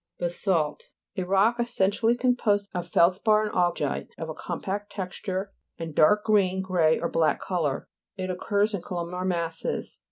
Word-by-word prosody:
BASA'LT 175 Hz, -3 st, 0 dB, 0.3 s
A 185 Hz, -, -1 dB
rock 200 Hz, +6 st, +3 dB
essentially 230 Hz, 0 st, +2 dB
com 250 Hz, 0 st, +2 dB
posed 205 Hz, -4 st, +1 dB
of 175 Hz, -1 st, -3 dB
feldspar, 205 Hz, +5 st, +3 dB
and 210 Hz, -, -2 dB
augite 175 Hz, -5 st, 0 dB
of 160 Hz, -, -5 dB
a -, -, -3 dB
compact 195 Hz, +5 st, -4 dB
texture, 190 Hz, 0 st, -4 dB, 0.2 s
and 165 Hz, -2 st, -6 dB
dark 210 Hz, +8 st, +4 dB
green, 190 Hz, -4 st, +2 dB
grey 170 Hz, -4 st, +2 dB
or 170 Hz, -, -1 dB
black 160 Hz, -3 st, +1 dB
colour. 160 Hz, -7 st, -2 dB, 0.3 s
It 185 Hz, -1 st, -2 dB
occurs 205 Hz, +3 st, 0 dB
in 200 Hz, -, -2 dB
columnar 180 Hz, 0 st, -4 dB
masses. 170 Hz, -3 st, -3 dB
185 Hz, 155 wpm, -26 LUFS, 170-205 Hz, 0.3 s, dark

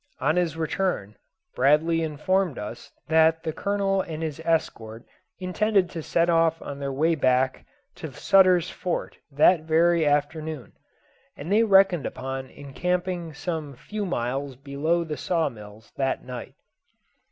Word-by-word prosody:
On 155 Hz, -, +1 dB
his 170 Hz, -3 st, 0 dB
return, 160 Hz, -, -2 dB, 0.4 s
Bradley 150 Hz, +5 st, +3 dB
informed 165 Hz, +1 st, 0 dB
us 110 Hz, +3 st, -8 dB, 0.2 s
that 160 Hz, 0 st, +3 dB
the 160 Hz, -, -3 dB
Colonel 200 Hz, 0 st, 0 dB
and 165 Hz, -3 st, -6 dB
his 155 Hz, -2 st, -4 dB
escort 115 Hz, -8 st, -2 dB, 0.3 s
intended 190 Hz, 0 st, +1 dB
to 165 Hz, -, -5 dB
set 170 Hz, +2 st, +1 dB
off 165 Hz, -1 st, +2 dB
on 140 Hz, -1 st, -7 dB
their 140 Hz, -1 st, -3 dB
way 155 Hz, +5 st, +2 dB
back 130 Hz, -3 st, +1 dB, 0.3 s
lo 160 Hz, -, -5 dB
Sutter's 185 Hz, +4 st, +4 dB
Fort 180 Hz, -2 st, -4 dB
that 155 Hz, +4 st, +4 dB
very 165 Hz, +1 st, +3 dB
afternoon, 150 Hz, -2 st, -1 dB, 0.6 s
and 155 Hz, +6 st, -6 dB
they 215 Hz, +2 st, +5 dB
reckoned 195 Hz, -6 st, +4 dB
upon 135 Hz, 0 st, -5 dB
encamping 175 Hz, +4 st, -3 dB
some 155 Hz, -4 st, -4 dB
few 210 Hz, -, -5 dB
miles 135 Hz, -5 st, -3 dB
below 145 Hz, +6 st, -1 dB
the 155 Hz, -3 st, -5 dB
saw 165 Hz, -4 st, 0 dB
mills 105 Hz, -2 st, -13 dB
that 135 Hz, -1 st, -1 dB
night. 125 Hz, -1 st, -8 dB
160 Hz, 140 wpm, -25 LUFS, 140-175 Hz, 0.6 s, they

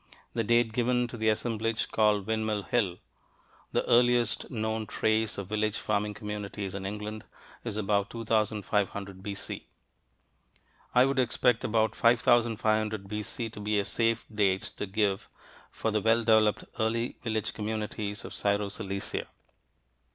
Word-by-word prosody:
The 115 Hz, -, 0 dB
date 120 Hz, +1 st, +3 dB
given 125 Hz, +1 st, +2 dB
to -, -, -7 dB
the 110 Hz, -1 st, +1 dB
assemblage 115 Hz, 0 st, -1 dB
called 105 Hz, -2 st, +3 dB
Windmill 110 Hz, -1 st, -1 dB
Hill, 100 Hz, -7 st, 0 dB, 0.7 s
the -, -, +1 dB
earliest 120 Hz, -1 st, +3 dB
known 110 Hz, -2 st, -2 dB
trace 110 Hz, 0 st, +1 dB
of 100 Hz, -, -4 dB
village 110 Hz, 0 st, 0 dB
farming 105 Hz, 0 st, -1 dB
communities 105 Hz, -2 st, -5 dB
in 95 Hz, -1 st, -4 dB
England, 105 Hz, +1 st, -5 dB, 0.4 s
is 110 Hz, -3 st, -3 dB
about 100 Hz, -1 st, +1 dB
2500 105 Hz, -3 st, -1 dB
B.C. 100 Hz, 0 st, -5 dB, 1.3 s
I 125 Hz, +1 st, +7 dB
would 135 Hz, 0 st, +1 dB
expect 125 Hz, -1 st, +2 dB
about 110 Hz, -1 st, +2 dB
5500 110 Hz, -3 st, +3 dB
B.C. 105 Hz, +2 st, -4 dB
to 110 Hz, -, -9 dB
be 105 Hz, +1 st, 0 dB
a 100 Hz, -, 0 dB
safe 115 Hz, +1 st, +1 dB
date 95 Hz, -3 st, +1 dB
to 105 Hz, -, -3 dB
give 100 Hz, -1 st, 0 dB, 0.4 s
for 110 Hz, -, -2 dB
the 105 Hz, 0 st, +1 dB
well 115 Hz, +2 st, +4 dB
developed 110 Hz, -2 st, +4 dB, 0.2 s
early 115 Hz, +2 st, 0 dB
village 110 Hz, -2 st, -1 dB
communities 105 Hz, -1 st, -3 dB
of -, -, -8 dB
Syro 100 Hz, 0 st, +1 dB
Cilicia. 100 Hz, -1 st, -4 dB
110 Hz, 135 wpm, -29 LUFS, 105-115 Hz, 1.3 s, I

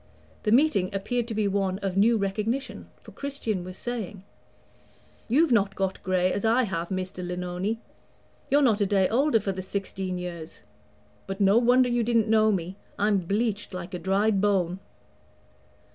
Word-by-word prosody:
The 210 Hz, -, 0 dB
meeting 235 Hz, -8 st, +3 dB
appeared 235 Hz, +4 st, -1 dB
to 225 Hz, -, -4 dB
be 210 Hz, -1 st, +1 dB
one 195 Hz, -1 st, 0 dB
of 190 Hz, -2 st, -2 dB
new 225 Hz, +4 st, +4 dB
recognition, 215 Hz, +6 st, -3 dB
for -, -, -14 dB
Christian 250 Hz, -9 st, -3 dB
was 185 Hz, +1 st, -8 dB
saying: 220 Hz, -5 st, -5 dB, 1.0 s
"You've 285 Hz, +5 st, +3 dB
not 200 Hz, -4 st, +2 dB
got 190 Hz, -1 st, -2 dB
gray, 185 Hz, 0 st, +1 dB
as 200 Hz, -, -3 dB
I 230 Hz, +3 st, +3 dB
have, 170 Hz, -6 st, -3 dB
Mr. 185 Hz, -1 st, -4 dB
Lenoni; 180 Hz, +4 st, -3 dB, 0.7 s
you're 290 Hz, +1 st, +4 dB
not 220 Hz, -5 st, +3 dB
a 200 Hz, -, +3 dB
day 190 Hz, -1 st, +3 dB
older 250 Hz, +1 st, +3 dB
for 200 Hz, -1 st, -2 dB
the 190 Hz, 0 st, -5 dB
sixteen 190 Hz, -1 st, -4 dB
years. 170 Hz, -3 st, -7 dB, 0.7 s
But 195 Hz, +1 st, -5 dB
no 200 Hz, +3 st, +5 dB
wonder 250 Hz, +1 st, +4 dB
you 240 Hz, 0 st, +1 dB
didn't 230 Hz, -1 st, +2 dB
know 215 Hz, 0 st, +4 dB
me; 185 Hz, 0 st, -3 dB, 0.2 s
I'm 205 Hz, -1 st, +2 dB
bleached 205 Hz, +2 st, -2 dB
like 180 Hz, 0 st, -7 dB
a 180 Hz, -, -3 dB
dried 195 Hz, +3 st, +1 dB
bone." 190 Hz, -3 st, +1 dB
200 Hz, 165 wpm, -26 LUFS, 185-225 Hz, 1.0 s, no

